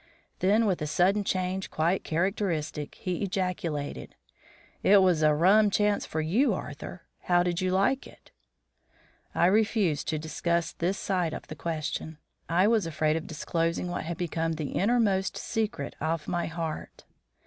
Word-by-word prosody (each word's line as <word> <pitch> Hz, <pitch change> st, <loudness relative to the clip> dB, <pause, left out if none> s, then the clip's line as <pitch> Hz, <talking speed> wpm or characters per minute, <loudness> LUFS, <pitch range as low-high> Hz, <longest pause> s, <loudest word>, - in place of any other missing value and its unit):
Then 210 Hz, +5 st, +3 dB
with 190 Hz, -6 st, 0 dB
a 150 Hz, -, -1 dB
sudden 190 Hz, +6 st, +2 dB
change 185 Hz, 0 st, -2 dB
quite 170 Hz, +4 st, 0 dB
characteristic, 165 Hz, -4 st, -1 dB
he 180 Hz, -2 st, -3 dB
ejaculated, 180 Hz, -6 st, -3 dB, 0.7 s
"It 195 Hz, -1 st, +6 dB
was 180 Hz, -4 st, +3 dB
a 155 Hz, -1 st, +4 dB
rum 200 Hz, +7 st, +5 dB
chance 205 Hz, 0 st, +1 dB
for 160 Hz, -, -2 dB
you, 210 Hz, -, +2 dB
Arthur. 170 Hz, +2 st, -7 dB, 0.2 s
How 175 Hz, -1 st, +4 dB
did 175 Hz, 0 st, -1 dB
you 185 Hz, -, +1 dB
like 195 Hz, +9 st, +1 dB
it?" -, -, -19 dB, 1.0 s
I -, -, +4 dB
refused 200 Hz, -5 st, +2 dB
to 155 Hz, -, 0 dB
discuss 165 Hz, +2 st, -1 dB
this 185 Hz, +4 st, -1 dB
side 180 Hz, -5 st, -1 dB
of -, -, -8 dB
the 155 Hz, -, -6 dB
question. 160 Hz, 0 st, -4 dB, 0.3 s
I 175 Hz, +3 st, +4 dB
was 215 Hz, -5 st, +3 dB
afraid 155 Hz, -1 st, +1 dB
of 165 Hz, -, -3 dB
disclosing 165 Hz, +2 st, -1 dB
what 175 Hz, -, -3 dB
had 170 Hz, 0 st, -4 dB
become 165 Hz, -1 st, -1 dB
the 155 Hz, -3 st, -4 dB
inner 235 Hz, +6 st, +2 dB
most 195 Hz, -4 st, +1 dB
secret 225 Hz, +1 st, -3 dB
of 160 Hz, 0 st, -1 dB
my 175 Hz, -1 st, -1 dB
heart. 165 Hz, -1 st, -5 dB
175 Hz, 160 wpm, -28 LUFS, 160-195 Hz, 1.0 s, It